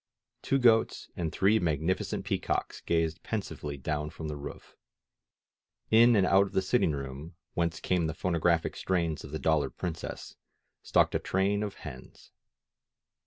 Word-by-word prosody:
Two 135 - +1
goats 115 -4 +3
and 80 -3 -2
three 105 +3 +3
magnificent 80 +1 -1
pea - - 0
cocks - - -2
gazed 80 -1 0
pensively 75 -9 -4
down 75 +2 -2
from 80 -1 -7
the 75 - -4
roof. 70 - -9 1.2
In 115 +2 +7
and 100 -3 +4
out 95 +1 +4
of - - -13
the 95 - +2
sitting 95 -5 +2
room, 70 +4 -6 0.2
whence 85 -1 -1
came 90 -3 +1
the 80 - -4
phonographic 85 -2 +1
strains 85 -5 -1
of - - -9
the 75 - -4
^^Dollar 75 -4 +2
Princess," 85 -2 -5 0.4
stalked - - +2
a - - +1
train 100 +2 0
of 105 -2 -3
hens. 65 -4 -11
85 Hz, 155 wpm, -29 LUFS, 75-95 Hz, 1.2 s, In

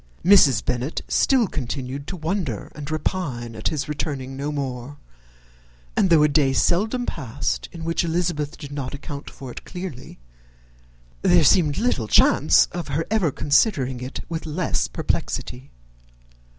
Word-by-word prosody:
Mrs. 145 - +6
Bennet 125 +5 -2
still 260 -4 +3
continued 135 - -4
to 185 - -5
wonder 160 - -3
and 145 -2 -7
repine 145 -8 -3
at 110 - -3
his 150 -3 -2
returning 140 -3 -4
no 140 +2 -3
more; 135 -1 -4 1.0
and 190 - +3
though 160 -3 +6
a - - +6
day 145 -2 +2
seldom 220 - +1
passed 135 - -3
in 170 -2 -8
which 165 +1 0
Elizabeth 165 -3 -1
did 145 -3 -9
not 140 -2 -4
account 140 0 -7
for 130 -2 -9
it - - -9
clearly, 180 -8 -8 1.0
there 180 -3 +5
seemed 150 -1 +4
little 205 - 0
chance - - +5
of 175 -1 -5
her 150 +3 -1
ever 200 -9 +2
considering 135 - +1
it 125 +1 -5
with 165 0 -5
less 165 +3 -1
perplexity. 130 +3 -3
150 Hz, 145 wpm, -23 LUFS, 135-170 Hz, 1.0 s, Mrs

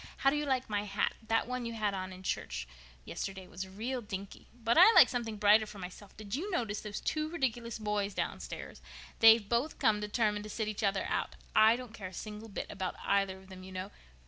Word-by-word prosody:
How 275 - +4
do - - 0
you 295 0 -1
like 260 -2 0
my 205 -1 -1
hat? 200 0 0
That 225 0 +2
one 250 0 -3
you 230 0 -4
had 210 -3 0
on 185 -1 -4
in 185 0 -10
church 60 - -3 0.4
yesterday 190 -1 -5
was 185 +2 -6
real 235 +7 -4
dinky. 200 -3 -7
But 235 0 0
I 370 +6 +9
like - - +9
something 235 -3 -3
brighter 210 +1 +5
for 210 - -10
myself. 190 +2 -10
Did 205 -1 -8
you 335 +11 -2
notice 225 - -1
those 210 -1 -5
two 310 0 -1
ridiculous 240 -8 -2
boys 210 -2 -1
downstairs? - - -5 0.4
They've 225 -2 +8
both 240 +8 0
come 215 -1 +3
determined 210 0 0
to - - -7
sit 220 0 -2
each 215 0 -3
other 195 -2 +1
out. - - -2 0.2
I 220 +1 +7
don't 245 -2 -8
care 195 -4 -6
a 185 - -11
single 215 +4 -7
bit 200 - -4
about 190 -3 -3
either 195 -1 +2
of 190 0 -16
them, 185 -1 -10
you 190 +1 -10
know. 185 +2 -5
210 Hz, 225 wpm, -32 LUFS, 195-235 Hz, 0.4 s, I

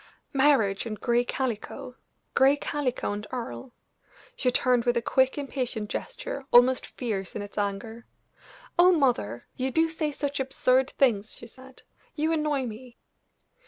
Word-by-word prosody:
"Marriage 265 -8 +3
and 215 -2 -5
gray 240 -1 +2
calico! 250 0 -4 0.4
gray 275 +2 +5
calico 285 -7 -2
and 205 +1 -5
Earle!" 250 +1 -6 0.6
She 255 - +1
turned 250 -1 +2
with 240 0 +1
a - - +1
quick, 260 +3 +2
impatient 255 -6 -3
gesture, - - -5
almost 250 +2 +5
fierce 205 -7 -4
in 210 - -3
its 205 - -11
anger. 210 +3 -3 0.7
"Oh, 360 +1 +8
mother! 245 - +1
you 260 +1 0
do 325 +4 +2
say 315 -2 -2
such 285 -1 -3
absurd 265 0 +2
things," 220 -8 +1
she - - -11
said; 260 +2 -15 0.3
"you 315 +1 0
annoy 300 -4 0
me." 235 +2 -9
255 Hz, 145 wpm, -27 LUFS, 230-275 Hz, 0.7 s, Oh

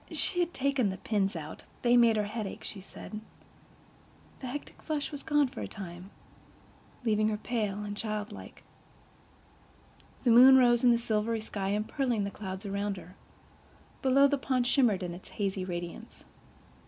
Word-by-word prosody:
She 355 - 0
had 350 -1 +1
taken 270 - +1
the 190 - -4
pins 200 -3 0
out—they 165 +9 -2
made 235 -2 +6
her 210 - +2
head 215 0 -4
ache, - - -8
she 195 - -5
said. 210 +2 -9 1.2
The 260 - -6
hectic 285 +4 -7
flush 300 -2 -3
was 290 -1 -6
gone 295 -2 +2
for 255 -1 -8
the - - -3
time, 185 -2 -9 1.0
leaving 215 -1 +3
her 210 - -1
pale 210 -3 -2
and 205 0 -5
childlike. 210 -1 -5 1.6
The 245 - +4
moon 260 +3 +9
rose 240 -2 +4
in 250 - +7
the 235 - +5
silvery 225 -1 0
sky, 200 -3 -3
empearling 230 0 -1
the 200 - -3
clouds 190 0 -6
around 200 0 -2
her. 180 +1 -12 0.9
Below, 270 +1 +5
the 285 0 0
pond 255 -2 0
shimmered 240 -7 +3
in 175 -1 -4
its 175 - -11
hazy 195 -2 -2
radiance. 175 -2 -6
215 Hz, 160 wpm, -30 LUFS, 200-255 Hz, 1.6 s, moon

